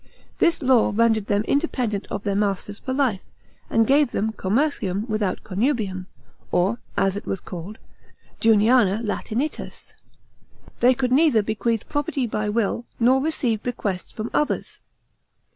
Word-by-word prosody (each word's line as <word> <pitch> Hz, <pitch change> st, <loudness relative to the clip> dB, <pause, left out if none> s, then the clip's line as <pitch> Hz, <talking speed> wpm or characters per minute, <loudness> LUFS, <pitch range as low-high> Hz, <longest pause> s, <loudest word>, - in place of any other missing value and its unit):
This 335 Hz, -3 st, +3 dB
law 255 Hz, -3 st, +4 dB
rendered 225 Hz, -2 st, +2 dB
them 205 Hz, 0 st, +1 dB
independent 245 Hz, -8 st, -1 dB
of 200 Hz, -, -4 dB
their 200 Hz, -, 0 dB
masters 200 Hz, 0 st, -1 dB
for 260 Hz, -, -5 dB
life, 260 Hz, -8 st, +1 dB, 0.5 s
and 225 Hz, 0 st, +3 dB
gave 280 Hz, +2 st, +4 dB
them 220 Hz, 0 st, -1 dB
commercium 210 Hz, -2 st, -1 dB
without 215 Hz, -4 st, -1 dB
connubium, 200 Hz, -3 st, -1 dB, 0.4 s
or, 195 Hz, +7 st, +1 dB, 0.2 s
as 195 Hz, -1 st, +2 dB
it 205 Hz, -, -6 dB
was 195 Hz, -, -2 dB
called, 185 Hz, +5 st, -8 dB, 0.6 s
Juniana 220 Hz, -1 st, +4 dB
Latinitas. 230 Hz, +6 st, -4 dB, 0.9 s
They 250 Hz, +2 st, +5 dB
could 250 Hz, 0 st, -1 dB
neither 265 Hz, -6 st, +4 dB
bequeath 220 Hz, +1 st, -1 dB
property 290 Hz, -2 st, -1 dB
by 215 Hz, -2 st, -2 dB
will, 230 Hz, +2 st, -1 dB
nor 255 Hz, +3 st, +4 dB
receive 250 Hz, -8 st, -1 dB
bequests 205 Hz, -7 st, -3 dB
from 220 Hz, +2 st, -6 dB
others. 300 Hz, -, -1 dB
225 Hz, 135 wpm, -23 LUFS, 205-255 Hz, 0.9 s, They